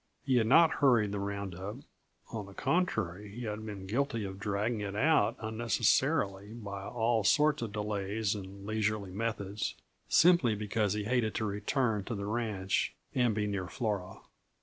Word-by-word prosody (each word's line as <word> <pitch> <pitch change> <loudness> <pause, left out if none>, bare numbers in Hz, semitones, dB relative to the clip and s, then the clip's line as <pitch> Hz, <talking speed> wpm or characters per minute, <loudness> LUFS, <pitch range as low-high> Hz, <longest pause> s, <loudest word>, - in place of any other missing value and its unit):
He 130 -2 +3
had 110 -2 +3
not 160 +6 +7
hurried 120 -7 +4
the 100 - -2
round 100 -1 -3
up 95 +5 -6 0.6
on 105 -3 -5
the 100 - -13
contrary 105 - 0
he 120 +5 -7
had 105 -1 -4
been 100 -3 -6
guilty 115 +1 -1
of 95 0 -7
dragging 105 +3 -1
it 100 -1 -4
out 155 +9 +3
unnecessarily 110 -1 +1
by 100 -4 -6
all 115 -2 +1
sorts 150 +8 +4
of 115 -3 -3
delays 105 0 -1
and 100 -1 -8
leisurely 105 -2 -1
methods 105 -1 -3 0.3
simply 165 -10 +5
because 105 0 0
he 105 0 -2
hated 110 -1 0
to 110 - 0
return 105 +1 0
to 115 - -3
the 100 0 -4
ranch 105 -4 -1 0.2
and 120 -4 +2
be 105 -1 0
near 100 -3 -2
Flora. 100 -5 -3
105 Hz, 165 wpm, -31 LUFS, 100-115 Hz, 0.6 s, not